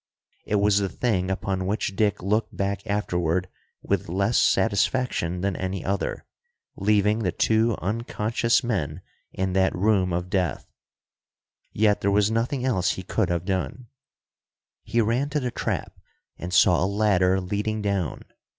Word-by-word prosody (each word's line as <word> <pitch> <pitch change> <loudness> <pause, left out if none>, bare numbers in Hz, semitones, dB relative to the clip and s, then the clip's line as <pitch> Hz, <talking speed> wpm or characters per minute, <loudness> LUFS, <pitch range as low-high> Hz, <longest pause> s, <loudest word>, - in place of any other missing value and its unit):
It 105 - -1
was 100 0 +3
the 100 -1 -1
thing 95 -3 -1
upon 95 -1 -2
which 100 -1 -2
Dick 105 -3 +1
looked 105 +4 -1
back 100 +2 -2
afterward 90 -3 0 0.4
with - - -1
less 100 +6 +1
satisfaction 100 -5 +1
than 100 -1 -1
any 95 -1 -4
other, 100 +1 -2 0.5
leaving 105 +1 +2
the 95 -5 0
two 110 +3 +2
unconscious 115 +2 0
men 90 -8 -2 0.3
in 95 0 -2
that 95 0 +2
room 95 -1 +2
of 90 +1 -3
death. 90 -3 -1 1.1
Yet 105 -1 +2
there 100 - +2
was 105 +1 +3
nothing 125 +3 -1
else 95 -9 +1
he 95 - -7
could 100 0 0
have 85 0 -1
done. 100 +5 -3 0.9
He 120 - 0
ran 120 +6 0
to 150 - 0
the 125 -3 -2
trap, - - -3 0.4
and 90 - -7
saw 90 -1 +4
a - - +2
ladder 95 -3 +2
leading 105 +3 -2
down. 100 -5 -2
100 Hz, 150 wpm, -25 LUFS, 95-110 Hz, 1.1 s, saw